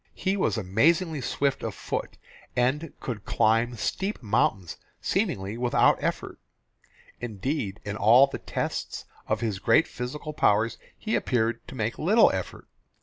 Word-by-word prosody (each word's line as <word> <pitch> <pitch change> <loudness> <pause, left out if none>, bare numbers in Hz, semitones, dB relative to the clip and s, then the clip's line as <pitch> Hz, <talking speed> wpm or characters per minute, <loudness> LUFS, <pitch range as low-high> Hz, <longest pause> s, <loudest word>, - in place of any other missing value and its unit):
He 190 +1 0
was 190 - 0
amazingly 155 - +2
swift 140 +2 -1
of - - -4
foot, - - -4 0.4
and 135 +6 +1
could 115 -4 -5
climb 115 +2 +2
steep 195 - -3
mountains 100 -5 0 0.2
seemingly 100 +4 -1
without 125 -1 +3
effort. - - -3 0.8
Indeed 110 -1 -3
in 105 0 -3
all 115 +6 +7
the 140 - -7
tests - - -4 0.2
of - - 0
his 110 -5 -2
great 115 +10 +4
physical 150 +5 -6
powers 110 -3 +2 0.2
he 220 - -4
appeared 115 -2 0
to - - -9
make 110 -1 -2
little 210 +9 +5
effort. - - -5
120 Hz, 140 wpm, -26 LUFS, 110-150 Hz, 0.8 s, all